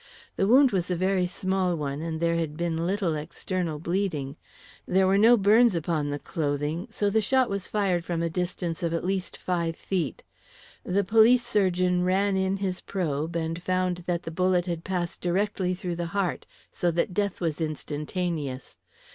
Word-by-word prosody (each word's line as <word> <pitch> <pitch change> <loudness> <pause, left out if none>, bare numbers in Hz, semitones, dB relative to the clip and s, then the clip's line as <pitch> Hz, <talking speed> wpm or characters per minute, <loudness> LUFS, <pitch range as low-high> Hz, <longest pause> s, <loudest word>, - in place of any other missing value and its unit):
The 195 - +1
wound 260 +3 +6
was 185 -2 -1
a 180 - +1
very 185 0 +1
small 185 0 0
one, 145 -2 -3
and 160 -1 -3
there 170 0 +1
had 160 -3 -2
been 170 -1 -1
little 190 -3 0
external 165 +1 -3
bleeding. 160 -5 -2 0.5
There 190 +1 +3
were 195 +1 +3
no 235 +3 +7
burns 215 +1 +5
upon 160 -3 -1
the 145 - -2
clothing, 150 - -2
so 205 -2 0
the 220 +2 +3
shot 255 +2 +2
was 200 -1 -2
fired 190 -5 0
from 170 -1 -2
a - - +1
distance 175 -1 -2
of 170 -1 0
at 165 - -3
least 190 -1 -2
five 170 -2 -1
feet. 170 -9 -3 0.6
The 200 +2 +1
police 225 +5 +5
surgeon 185 -5 +2
ran 195 +2 +2
in 190 +1 +1
his 190 -2 -3
probe, 165 -3 -2
and 165 +1 -2
found 185 0 0
that 175 -1 -1
the 165 - -5
bullet 180 +1 +2
had 170 -2 -3
passed 180 -3 -3
directly 185 0 0
through 175 -2 -4
the 170 -1 -2
heart, 190 -3 -1 0.2
so 175 - 0
that 170 +2 0
death 200 0 -1
was 165 -3 -2
instantaneous. 150 -2 -3
180 Hz, 180 wpm, -26 LUFS, 165-195 Hz, 0.6 s, no